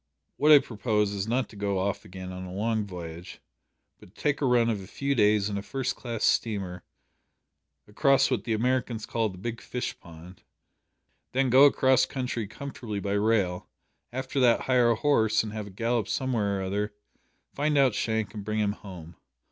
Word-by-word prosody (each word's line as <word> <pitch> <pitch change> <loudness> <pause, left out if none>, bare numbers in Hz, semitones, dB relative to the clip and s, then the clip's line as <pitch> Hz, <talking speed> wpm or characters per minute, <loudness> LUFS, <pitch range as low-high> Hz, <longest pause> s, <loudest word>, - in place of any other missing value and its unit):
What 150 - +4
I 150 - +11
propose 105 -5 0
is 100 0 -3
not 125 +3 0
to - - -14
go 100 -1 -1
off 95 +1 -2
again 95 0 -8
on 90 0 -7
a 90 - -8
long 110 +2 -1
voyage, 85 -2 -8 0.6
but 90 - -18
to - - -19
take 150 -1 +1
a 140 - +2
run 120 -2 +3
of 110 -4 -1
a 95 - -11
few 140 +7 -2
days 105 -4 +3
in 100 -1 -2
a - - -5
first 130 +4 -3
class 115 -3 -5
steamer 95 -6 0 1.0
across 135 +6 +3
what 120 -6 0
the 115 - -1
Americans 120 -1 0
call 115 -2 -1
the 95 - -10
big 115 +5 -5
fish 125 - -5
pond; 85 +2 -13 0.9
then 130 -1 +2
go 135 +3 +8
across 130 -2 +4
country 125 -5 -3
comfortably 115 -3 -6
by 100 0 -3
rail; 100 -4 +1 0.4
after 130 +2 -3
that 120 -3 +4
hire 125 -2 +3
a 115 - +3
horse 110 -4 +2
and 105 -1 -6
have 105 -2 -5
a - - -9
gallop 115 +2 -1
somewhere 110 -7 -1
or 95 - -3
other; 105 +2 -2 0.6
find 150 +1 0
out 135 -4 +4
Shank 110 0 -1
and 105 -2 -6
bring 110 +1 -3
him 105 -1 +1
home. 90 -6 -10
110 Hz, 190 wpm, -27 LUFS, 100-125 Hz, 1.0 s, I